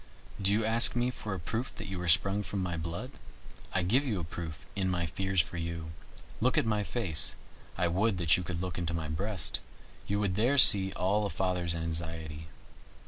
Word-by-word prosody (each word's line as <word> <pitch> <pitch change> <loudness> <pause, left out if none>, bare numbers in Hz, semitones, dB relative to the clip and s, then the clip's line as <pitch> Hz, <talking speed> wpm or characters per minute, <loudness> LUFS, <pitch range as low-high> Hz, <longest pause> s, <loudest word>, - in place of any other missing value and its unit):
Do 95 +1 +3
you 110 +2 +2
ask 115 +2 +6
me 125 +1 +1
for 105 -4 -5
a - - -5
proof 115 +9 -4
that - - -7
you 95 -1 -5
are 90 - -4
sprung 100 +5 +4
from 100 -1 -3
my 85 -2 -2
blood? 85 +10 -5 0.6
I 95 - 0
give 120 +11 +2
you 110 -9 -2
a - - -4
proof 80 0 -7
in 95 -2 0
my 90 -2 -1
fears 95 +2 +1
for 85 - -7
you. 85 -1 -4 0.5
Look 130 +6 +1
at 150 - +3
my 105 -2 +1
face 100 -7 -2 0.4
I 85 0 +2
would 95 +4 +1
that 85 -3 +4
you - - -2
could 85 -1 -4
look 90 -1 -4
into 85 -1 -2
my 80 -2 -4
breast, 95 +4 -1 0.5
you 100 +1 0
would 100 -2 0
there 120 +8 +2
see 95 -7 +8
all 100 +3 +1
a - - -6
father's 90 -3 -1
anxiety. 80 -1 -4
95 Hz, 205 wpm, -30 LUFS, 85-105 Hz, 0.6 s, see